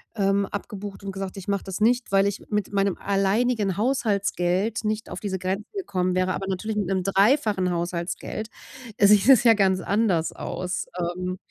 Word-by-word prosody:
ähm, 200 -1 +1
abgebucht 205 0 -7
und 195 - -4
gesagt: 195 0 -6
„Ich 190 - -8
mache 200 -1 -1
das 190 0 -5
nicht, 240 +2 +2
weil 195 0 +4
ich 200 -1 -2
mit 210 -2 -2
meinem 195 -1 +1
alleinigen 200 +1 +1
Haushaltsgeld 205 -3 0
nicht 215 +1 -2
auf - - -5
diese 195 -2 -3
Grenzen 190 +3 -3
gekommen 185 - -1
wäre”, 185 0 +1
aber 195 - -4
natürlich 210 +3 -3
mit 205 -3 0
'nem 190 -1 0
3-fachen 200 0 +2
Haushaltsgeld 175 +4 -3 0.5
sieht 205 +3 +5
es 255 -3 +7
ja 230 -2 +7
ganz 190 -3 +2
anders 195 -6 +1
aus, 180 0 -4
ähm. 180 +1 -3
195 Hz, 170 wpm, -24 LUFS, 185-210 Hz, 0.5 s, es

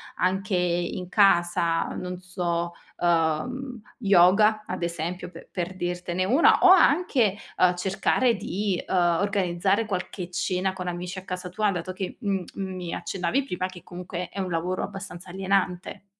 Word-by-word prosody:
anche 190 +1 0
i 175 -1 0
in 180 -1 -6
casa, 175 -4 +3
non 180 0 -5
so, 175 -2 -2 0.3
ehm, 175 - 0 0.2
yoga 205 +1 +5
ad 185 - -5
esempio 170 +1 -3
pe 165 -1 -13
per 180 0 -3
dirtene 175 0 -2
una, 260 - +5
o 375 - +8
anche, 285 - +4 0.2
uhm, 180 -1 +4
cercare 195 +7 +1
di, 200 -1 -2
uhm, - - -1 0.2
organizzare 200 +1 +1
qualche 185 -2 -4
cena 185 +1 -1
con 180 -1 -6
amici 180 +1 -4
a - - -13
casa 180 0 -5
tua, 210 +3 +1
dato 185 -1 -3
che 185 0 -5
m 195 -4 -1
mi 185 -3 -4
accennavi 190 +9 -1
prima 185 -7 -3
che 185 -1 -12
comunque 180 0 -6
è - - -7
un 190 -1 -2
lavoro 175 +2 -1
abbastanza 195 -3 -8
alienante. 190 0 -1
185 Hz, 150 wpm, -26 LUFS, 175-195 Hz, 0.3 s, o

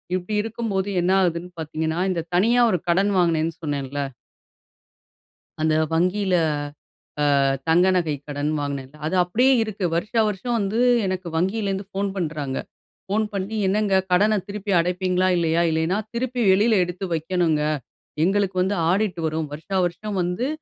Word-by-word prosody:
இப்டி 185 +4 -3
இருக்கும்போது 210 -3 -2
என்ன 180 +2 +1
ஆகுதுன்னு 175 0 -1
பார்த்தீங்கன்னா, 160 +1 -2
இந்த 170 -3 -2
தனியா 230 +7 +4
ஒரு 180 - +2
கடன் 195 +4 +3
வாங்கினேன்னு 165 -2 +2
சொன்னேன்ல. 145 -2 -3 1.6
அந்த 155 0 +2 0.2
வங்கியில 185 +3 +1 1.0
அ - - +3 0.3
தங்க 175 +3 +5
நகை 165 -5 +1
கடன் 145 0 -2
வாங்கினேன்ல, 140 0 -5
அது 160 - -1
அப்படியே 240 +10 +3
இருக்கு. 210 -3 -4
வருஷா 215 +7 0
வருஷம் 220 +4 -2
வந்து 210 +2 -1 0.3
எனக்கு 185 -2 -3
வங்கியிலிருந்து 195 +2 -1
ஃபோன் 200 0 -2
பண்ணுறாங்க. 150 -6 -3 0.5
ஃபோன் 215 +3 +1
பண்ணி, 200 +3 -3
"என்னங்க 195 0 +2
கடன 210 +3 +4
திருப்பி 200 0 -4
அடைப்பீங்களா? 180 +1 +1
இல்லையா? 170 0 +2
இல்லைனா, 160 +5 0 0.2
திருப்பி 245 +1 -2
வெளியில 205 +2 +4
எடுத்து 180 +2 -6
வைக்கணுங்க. 165 -2 0 0.6
எங்களுக்கு 195 0 +1
வந்து 200 +2 0
ஆடிட் 190 -2 0
வரும். 155 -1 -2
வருஷா 160 +6 -4
வருஷம் 195 +3 -3
வந்து 180 +9 -1
185 Hz, 135 wpm, -23 LUFS, 165-205 Hz, 1.6 s, தங்க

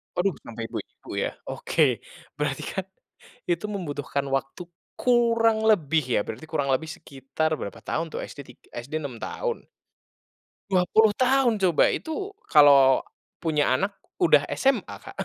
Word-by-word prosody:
aduh 185 +1 +1
sampai 115 -1 -7
ibu-ibu - - -9 0.2
ya, - - 0 0.2
oke - - -2 0.6
berarti 145 -2 -2
kan 190 -1 -3 0.7
itu 175 +4 0
membutuhkan 145 -6 -3
waktu 135 +6 -5 0.4
kurang 230 -2 +3
lebih 160 -5 +2
ya, - - +4
berarti 135 +8 -7
kurang 140 -3 0
lebih 160 - -2
sekitar 140 +3 -3
berapa 100 - -6
tahun 165 - -1
tuh, - - -4
SD - - -13
tig 125 - -16 0.2
SD 140 +5 -11
6 125 -5 -6
tahun. 475 -2 -3 1.1
Dua 180 -1 +3
puluh 220 +2 +5
tahun 255 -3 +3
coba, 180 -5 +4
itu 335 +5 -4 0.2
kalau 140 -3 +6 0.4
punya 150 -5 +2
anak 195 +7 -1 0.2
udah - - +5
SMA 270 -1 +1
Kak, - - -12
165 Hz, 140 wpm, -25 LUFS, 140-220 Hz, 1.1 s, kalau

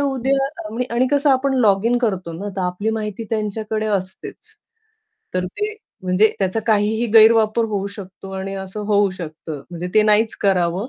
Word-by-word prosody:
उद्या 270 0 +1 0.5
आणि 250 +2 +3
कसं 285 0 +3
आपण 265 +1 +2
लॉगिन 220 +3 +3
करतो 190 -8 -1
ना, 200 +5 -5
तर - - -1
आपली 180 +4 -1
माहिती 215 0 -4
त्यांच्याकडे 215 0 -2
असतेच. 200 - -4 0.8
तर 185 - 0
ते 420 - -4 0.3
म्हणजे 185 +4 +3
त्याचा 195 +3 0
काहीही 220 +2 +2
गैरवापर 220 0 +6
होऊ 205 -3 -2
शकतो 195 0 -10
आणि 195 +1 -4
असं 190 +2 -6
होऊ 205 -2 +3
शकतं. 160 -4 -7
म्हणजे 175 +1 -5
ते 215 - +6
नाहीच 215 +1 +3
करावं 185 +3 +1
210 Hz, 155 wpm, -20 LUFS, 190-225 Hz, 0.8 s, गैरवापर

